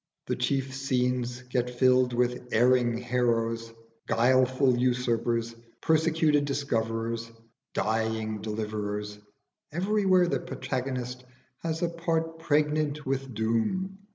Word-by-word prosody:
The - - -1
chief 135 -1 -1
scenes 125 -2 -1
get 125 -1 -1
filled 125 0 +3
with 125 0 0
erring 120 0 +3
heroes, 115 -2 0 0.4
guileful 130 +2 +3
usurpers, 120 -2 0 0.2
persecuted 160 -2 +2
discoverers, 115 -4 -2 0.4
dying 110 -1 -1
deliverers: 105 -1 -4 0.5
everywhere 190 +1 +3
the - - 0
protagonist 125 -1 -4 0.4
has 165 0 -3
a - - +3
part 165 -1 -2
pregnant 150 -1 +1
with 135 0 -2
doom. 115 - -1
125 Hz, 100 wpm, -28 LUFS, 115-145 Hz, 0.5 s, filled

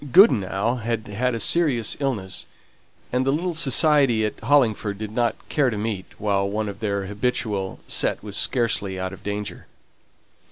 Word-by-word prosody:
Goodenough 115 - +4
had 115 -2 -3
had 120 +4 0
a - - -3
serious 130 -4 +2
illness; 115 -10 -3 0.7
and 125 +1 +2
the 135 - 0
little 170 +5 -1
society 140 -6 +3
at 105 - -4
Hollingford 115 -6 +2
did 105 0 -5
not 120 +1 +1
care 145 -4 +2
to 110 - -3
meet 105 -3 -3
while 100 -2 0
one 105 +1 -2
of 100 -1 -6
their 100 -3 -1
habitual 105 -2 -2
set - - 0
was 105 -2 -7
scarcely 105 -6 0
out 95 0 -3
of 95 - -11
danger. 105 0 -5
110 Hz, 160 wpm, -23 LUFS, 100-125 Hz, 0.7 s, Goodenough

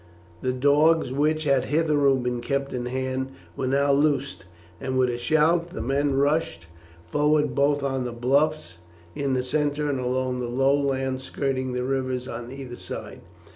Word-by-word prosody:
The 130 - 0
dogs, 145 +3 +3
which 155 +3 +1
had 140 -3 +2
hitherto 145 -2 +3
been 125 -1 -2
kept 140 +2 -2
in 125 -1 -3
hand, 130 +1 -3 0.2
were 130 - -2
now 140 +2 +2
loosed, 140 -4 +1 0.3
and 130 0 -2
with 130 -1 +3
a 120 - -3
shout 160 +6 +2
the 180 - -6
men 140 +2 +1
rushed 140 - 0 0.4
forward 150 - +2
both 145 0 +2
on 135 -2 -1
the 125 - -4
bluffs 130 - 0 0.3
in 135 +3 -1
the 125 - 0
centre 150 +2 0
and 140 -2 -1
along 125 0 -1
the 125 - -2
low 135 +3 +2
land 135 -2 0
skirting 130 -1 -2
the 125 0 -1
rivers 130 -1 -2
on 120 0 -6
either 130 -3 -8
side. - - -8
135 Hz, 170 wpm, -25 LUFS, 130-145 Hz, 0.4 s, dogs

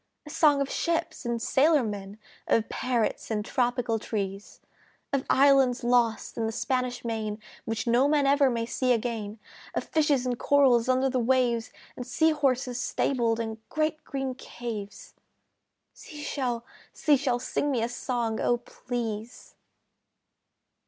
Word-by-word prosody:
A 300 - -9
song 290 -2 +4
of 275 - 0
ships 335 -6 -1
and 235 -1 -1
sailor 290 +5 +3
men, 205 -2 -5 0.3
Of 225 - +2
parrots 240 -3 -1
and 210 -2 -1
tropical 245 -2 0
trees; 200 -2 -5 0.5
Of 275 -1 0
islands 270 -2 +4
lost 240 -2 +1
in 225 - 0
the - - -2
Spanish 250 +1 -2
Main 220 -2 -2 0.3
Which 225 -1 -2
no 245 +3 +4
man 290 -1 +3
ever 280 0 +4
may 230 -2 -1
see 250 +2 +1
again, 225 -2 -3 0.4
Of - - 0
fishes 295 -5 +1
and 245 -1 -2
corals 260 -4 +4
under 260 +1 +3
the 260 -1 0
waves, 240 -1 +1 0.2
And 250 - -7
sea 320 +5 +3
horses 260 -4 0
stabled 235 -4 0
in 220 -1 -4
great 310 0 -1
green 270 -2 -3
caves 230 -5 -7 0.8
Sea 300 -2 -10
Shell, 245 -5 -2 0.3
Sea 300 - +3
Shell, 260 -3 0
Sing 255 +3 -2
me 245 -5 0
a - - +1
song, 235 -2 -2
O 240 - +2
please! 235 -2 -6
245 Hz, 145 wpm, -27 LUFS, 230-270 Hz, 0.8 s, song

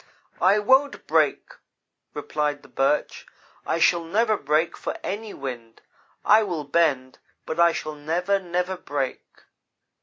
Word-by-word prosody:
"'I 190 +3 +5
won't 265 +7 +2
break,' - - +1 0.6
replied 150 -1 -2
the - - -15
Birch; 135 +2 -1 0.4
'I - - +1
shall 170 0 +3
never 215 +6 +1
break 155 +1 0
for - - -5
any 210 +2 -4
wind. 120 -7 -8 0.4
I 215 +2 +6
will 175 -8 -3
bend, 140 -4 0 0.3
but 160 - -4
I 170 0 +6
shall 155 -1 -5
never, 170 +7 -1
never 180 0 -2
break.' 140 -6 -3
170 Hz, 130 wpm, -24 LUFS, 145-195 Hz, 0.6 s, I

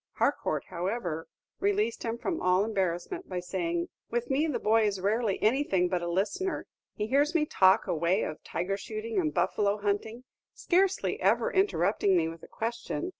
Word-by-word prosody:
Harcourt, - - 0
however, 175 -3 -3 0.3
released 205 +3 +1
him 230 0 -2
from 330 +7 -3
all 185 +2 +3
embarrassment 200 - -2
by 180 - -2
saying, 175 -1 -2 0.2
"With 240 +2 -2
me 290 +4 +2
the 295 - -1
boy 220 0 +3
is 200 -2 -2
rarely 205 +1 0
anything 215 -7 +2
but 180 -1 0
a 175 - -3
listener; 220 - -1 0.3
he 210 - -2
hears 285 +8 +2
me 310 -2 +3
talk 190 -9 +4
away 170 +5 +1
of 155 - -5
tiger 195 +3 -2
shooting 430 - -3
and 315 -4 +1
buffalo 205 -6 +1
hunting, 210 +3 -2 0.3
scarcely 375 +2 +1
ever - - +2
interrupting 375 - +2
me 165 -1 +2
with 165 0 -8
a - - -12
question. 235 +10 -3
210 Hz, 170 wpm, -29 LUFS, 185-275 Hz, 0.3 s, talk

